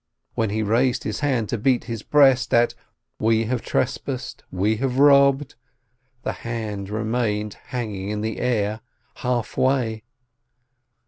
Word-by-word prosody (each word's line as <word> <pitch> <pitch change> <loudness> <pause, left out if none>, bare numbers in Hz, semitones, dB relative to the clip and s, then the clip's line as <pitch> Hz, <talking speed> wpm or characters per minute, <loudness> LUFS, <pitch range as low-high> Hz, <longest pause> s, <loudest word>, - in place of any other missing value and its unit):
When 110 -2 0
he 110 +2 -1
raised 120 +4 +1
his - - -3
hands 130 -7 0
to 120 - -1
beat 125 +2 +2
his 115 -2 -5
breast 135 -4 +4
at 120 0 +4 0.5
"We 110 +1 +2
have 120 0 -1
trespassed, - - -3
we 105 +4 0
have 130 +1 -1
robbed," 140 0 +5 0.7
the - - -1
hand 110 -4 -4
remained 110 -1 -1
hanging 105 -6 -4
in 105 0 -2
the 110 0 -3
air, 110 -3 0 0.4
half 125 -2 -2
way. 130 -4 +1
115 Hz, 135 wpm, -23 LUFS, 110-130 Hz, 0.7 s, robbed